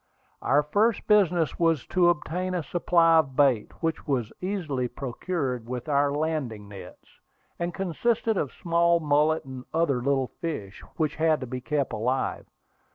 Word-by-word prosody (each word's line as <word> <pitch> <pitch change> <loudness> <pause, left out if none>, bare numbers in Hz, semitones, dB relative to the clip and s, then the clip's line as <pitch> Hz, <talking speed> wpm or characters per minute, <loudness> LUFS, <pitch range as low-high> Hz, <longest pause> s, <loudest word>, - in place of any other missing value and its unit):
Our 145 +2 +3
first 205 +9 +1
business 180 -6 +3
was 165 -4 +2
to 180 -2 +4
obtain 180 +3 -1
a 175 - -1
supply 165 0 +3
of 135 -4 -1
bait, 130 -7 +3
which 165 0 -2
was 125 -6 -1
easily 165 -10 -2
procured 130 -2 -4
with 125 +1 -5
our 145 -1 +2
landing 145 -9 -2
nets, 95 -3 -13 0.4
and 170 0 -1
consisted 215 +5 0
of 145 -8 -1
small 170 0 +2
mullet 150 0 +2
and 130 -1 -8
other 145 -7 +1
little 135 0 0
fish, 110 - -5 0.2
which 155 -2 -1
had 160 -1 +2
to - - -3
be 125 +1 -5
kept 140 +1 -1
alive. 125 +5 -1
150 Hz, 155 wpm, -26 LUFS, 130-170 Hz, 0.4 s, to